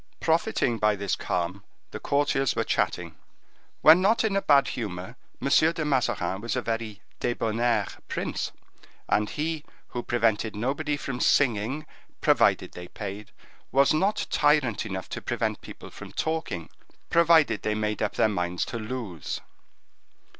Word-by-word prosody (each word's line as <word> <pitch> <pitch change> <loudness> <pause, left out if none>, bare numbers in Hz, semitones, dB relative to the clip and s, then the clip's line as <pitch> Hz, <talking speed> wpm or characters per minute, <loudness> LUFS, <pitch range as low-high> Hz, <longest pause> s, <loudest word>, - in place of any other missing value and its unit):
Profiting 160 - +1
by 105 0 +3
this 100 -1 -1
calm, 90 +3 -2 0.3
the - - -6
courtiers 140 -2 +1
were - - +1
chatting. 85 -3 -1 0.6
When 160 +4 +8
not 215 +5 +3
in 215 -3 +1
a 195 - +2
bad 140 -5 +4
humor, 105 0 -5 0.2
M. - - -2
de 160 +2 +3
Mazarin 105 -9 0
was 115 +3 -2
a 130 - 0
very 115 -2 -4 0.2
debonnaire 120 0 +1 0.2
prince, - - -3 0.6
and 105 0 +1
he, 155 0 -2 0.3
who 120 - -4
prevented 115 -2 0
nobody 145 +6 -1
from 135 -3 -5
singing, 130 +3 +2 0.3
provided - - +3
they 90 0 -9
paid, 100 +2 -7 0.4
was 140 +2 +4
not 195 +7 +1
tyrant 145 -8 +2
enough 95 -2 -5
to - - -5
prevent - - -2
people - - -11
from - - -10
talking, 160 - -3 0.4
provided 165 -8 +5
they 105 - -1
made 105 -1 -2
up - - -1
their - - +4
minds 90 -4 -1
to 115 - -5
lose. 110 - -5
120 Hz, 145 wpm, -26 LUFS, 105-150 Hz, 0.6 s, When